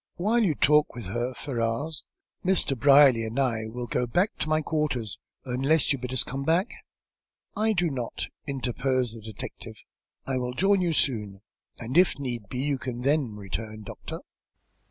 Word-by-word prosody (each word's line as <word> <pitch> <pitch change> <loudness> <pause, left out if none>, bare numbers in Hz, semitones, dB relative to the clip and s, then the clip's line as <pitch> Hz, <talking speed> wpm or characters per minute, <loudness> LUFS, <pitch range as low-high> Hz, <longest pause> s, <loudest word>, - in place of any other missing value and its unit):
While 225 +6 +2
you 165 -8 +2
talk 150 -2 +3
with 120 -4 -6
her, 120 +6 -2
Ferrars, 130 +4 -3 0.4
Mr. 180 -7 +3
Brierly 135 -2 +6
and 110 +4 -3
I 115 -5 0
will 120 +2 -5
go 125 +1 -1
back 180 - +1
to 155 - -1
my 155 0 +3
quarters, 145 -9 -2 0.3
unless 135 +5 +3
you 140 - -4
bid 125 0 -5
us 130 - +1
come 135 +2 -5
back." 170 - +2 0.8
"I 220 +1 +2
do 175 -4 +1
not," 125 -3 -3 0.2
interposed 130 -2 -1
the 115 - -10
detective. 110 -1 -8 0.5
"I 130 -1 -1
will 125 0 -3
join 195 +3 +3
you 175 -2 +1
soon, 105 -10 0 0.4
and 120 +3 -6
if 185 - +4
need 120 -7 -5
be, 125 - -5
you 140 -2 0
can 125 -1 -5
then 135 -4 +1
return, 105 +2 -6
doctor." - - -8
130 Hz, 170 wpm, -27 LUFS, 115-150 Hz, 0.8 s, Brierly